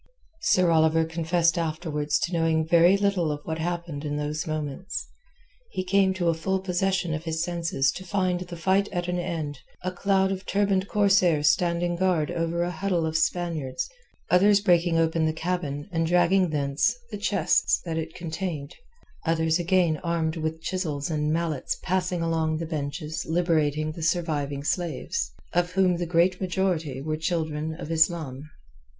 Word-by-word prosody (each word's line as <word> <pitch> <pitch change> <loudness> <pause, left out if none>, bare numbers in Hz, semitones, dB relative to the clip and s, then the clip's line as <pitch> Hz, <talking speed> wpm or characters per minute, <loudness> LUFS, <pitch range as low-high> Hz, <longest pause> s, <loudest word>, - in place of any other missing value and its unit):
Sir 185 - +3
Oliver 160 0 +4
confessed 170 +1 +1
afterwards 155 -2 -1
to 175 - -1
knowing 165 -1 +2
very 170 +3 +5
little 195 -5 +1
of 145 - -3
what 160 0 -4
happened 170 -3 -3
in 145 -1 -2
those 150 +2 -3
moments. 155 +4 -4 0.6
He 185 - -3
came 190 +1 +3
to 175 -2 -1
a - - +3
full 190 +4 -1
possession 185 -2 0
of 155 +2 -4
his 160 0 -1
senses 165 -6 0
to 190 - -8
find 185 -1 0
the 175 -1 -7
fight 190 +4 +2
at 175 -2 -2
an 180 0 -1
end, 155 -5 -4 0.2
a 185 - -1
cloud 190 +1 +1
of 190 0 -4
turbaned 200 -1 +1
corsairs 185 -8 +4
standing 175 0 0
guard 175 -4 +1
over 170 0 -1
a 175 - -2
huddle 180 -1 -1
of 160 0 -3
Spaniards, 160 - -1 0.4
others 200 +3 +5
breaking 175 -4 +3
open 165 0 +2
the 155 - 0
cabin 160 -3 -3
and 165 -1 0
dragging 180 +2 +3
thence 145 +7 +1 0.2
the 210 - -4
chests 205 0 +2
that 165 -1 -2
it 160 +1 -6
contained, 165 -3 -4 0.5
others 160 0 +2
again 175 -2 +2
armed 165 -1 -1
with 160 0 -3
chisels 160 -6 -2
and 150 -1 0
mallets 160 -4 -1
passing 180 -1 0
along 160 -1 0
the 165 - -3
benches 155 0 -4
liberating 155 -3 +1
the 165 - -8
surviving 150 -4 -1
slaves, 155 - -2 0.2
of 175 +1 +1
whom 185 -2 +3
the 175 0 -3
great 175 +2 +2
majority 175 -7 -1
were 155 +1 -1
children 160 -1 -2
of 165 -1 -7
Islam. 160 -4 +1
170 Hz, 165 wpm, -26 LUFS, 155-180 Hz, 0.6 s, very